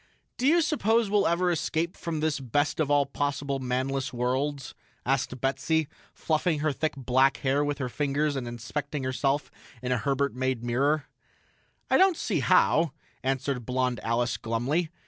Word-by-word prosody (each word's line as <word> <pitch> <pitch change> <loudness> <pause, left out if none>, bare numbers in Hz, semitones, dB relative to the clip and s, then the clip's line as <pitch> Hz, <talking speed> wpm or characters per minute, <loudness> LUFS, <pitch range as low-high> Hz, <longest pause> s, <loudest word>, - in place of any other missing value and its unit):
"Do 255 - +2
you 335 +3 +5
suppose 230 -8 +2
we'll 205 -1 +3
ever 175 +2 +2
escape 165 +1 -1
from 165 -3 -4
this 155 -2 0
best 145 +5 0
of 155 -3 +1
all 145 -1 +4
possible 140 0 -2
manless 130 +1 -1
worlds?" 130 +2 -2 0.3
asked 130 -1 0
Betsy, 140 +4 0 0.2
fluffing 160 +1 0
her 155 0 +2
thick 155 +3 -1
black 130 +1 +3
hair 140 +2 +1
with 145 -1 -1
her 130 -2 -2
fingers 145 +3 0
and 130 -3 -3
inspecting 135 +5 -4
herself 135 +2 0 0.3
in 125 +1 -3
a 125 - +2
Herbert 140 +4 0
made 130 -2 -1
mirror. 140 +5 +1 0.8
"I - - +4
don't 375 -3 +5
see - - -1
how," 165 -4 +3 0.3
answered 135 -1 -1
blond 125 0 -1
Alice 115 0 0
glumly. 130 +9 -1
140 Hz, 160 wpm, -27 LUFS, 130-155 Hz, 0.8 s, you